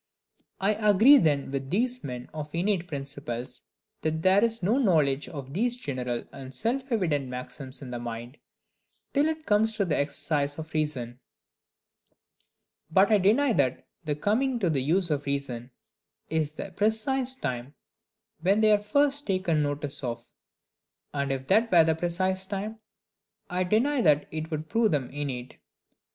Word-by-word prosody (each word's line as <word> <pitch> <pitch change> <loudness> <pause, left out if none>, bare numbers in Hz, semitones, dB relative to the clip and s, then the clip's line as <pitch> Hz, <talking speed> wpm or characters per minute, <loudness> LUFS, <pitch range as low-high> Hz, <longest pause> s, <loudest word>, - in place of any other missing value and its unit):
I 195 +2 +3 0.2
agree 235 +9 +8
then 145 - +1
with 135 -1 -3
these 245 - 0
men 125 -2 -6
of 150 0 -6
innate 180 0 0
principles, 140 -5 -5 0.4
that 160 0 -1
there 190 +3 +5
is 230 -3 0
no 220 +9 +3
knowledge 150 - +2
of 140 -4 -8
these 240 +6 0
general 125 - -3
and 135 -1 -9
self 255 +4 -1
evident 160 - 0
maxims 130 +2 -7
in 125 - -8
the 120 - -4
mind, 120 +2 -6 0.8
till 290 +2 +3
it 315 0 -3
comes 220 +1 +2
to 200 - +2
the 160 -4 0
exercise 145 0 -1
of 160 0 -8
reason: 130 -6 -2 1.7
but 190 +6 +4
I 210 - +6
deny 230 +8 +4
that 130 - +1 0.2
the 150 -2 -1
coming 240 - +1
to 185 -7 +1
the 140 -4 +1
use 170 +5 +1
of 145 -1 -1
reason 130 -4 -3 0.6
is 155 -2 0
the 190 +5 -6
precise 245 +6 +1
time 130 - -4 0.6
when 195 +6 +2
they 215 -1 +5
are 210 - +5
first 285 +6 +1
taken 185 -5 +1
notice 145 0 -3
of; 120 -2 -5 0.8
and 140 -1 -1
if 135 -1 -3
that 220 - +3
were 170 -3 +7
the 160 0 +2
precise 185 +3 -1
time, 210 +3 -4 0.7
I 180 +1 +1
deny 250 +8 +2
that 150 -5 +3
it 160 0 -4
would 155 -1 -4
prove 225 +4 +2
them 135 -4 -1
innate. 130 -3 -5
160 Hz, 160 wpm, -27 LUFS, 140-210 Hz, 1.7 s, agree